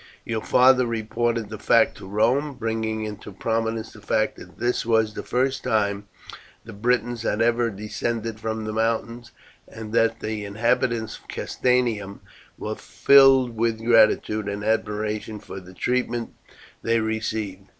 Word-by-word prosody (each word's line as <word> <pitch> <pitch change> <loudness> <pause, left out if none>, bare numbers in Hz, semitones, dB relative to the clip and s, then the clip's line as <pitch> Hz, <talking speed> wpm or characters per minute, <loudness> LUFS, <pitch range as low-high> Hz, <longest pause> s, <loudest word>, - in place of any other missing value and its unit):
"Your 110 -1 -2
father 130 +1 +4
reported 115 0 -1
the 110 -1 -7
fact 115 +1 +3
to - - -10
Rome, 125 +8 +1
bringing 110 -2 -2
into 105 -1 -8
prominence 115 +2 -2
the 105 - -14
fact 110 +1 0
that - - -13
this 120 +1 0
was 110 -2 +2
the - - -5
first 130 +2 0
time 100 -2 0 0.6
the 115 - -9
Britons 120 +2 0
had 110 -1 -1
ever 120 +1 +2
descended 110 +2 -4
from 110 0 -3
the 110 - -4
mountains, 115 +1 -1 0.4
and 110 -1 -9
that 115 0 +2
the 110 -1 -4
inhabitants 110 +2 0
of - - -26
Castanium 115 -6 -1 0.4
were - - -4
filled 135 -3 +5
with 115 0 0
gratitude 110 -2 +3
and 100 0 -4
admiration 105 0 -1
for 95 - -9
the 95 0 -14
treatment 125 +2 -1 0.5
they 115 0 +1
received. 110 -3 -3
110 Hz, 145 wpm, -24 LUFS, 105-120 Hz, 0.6 s, filled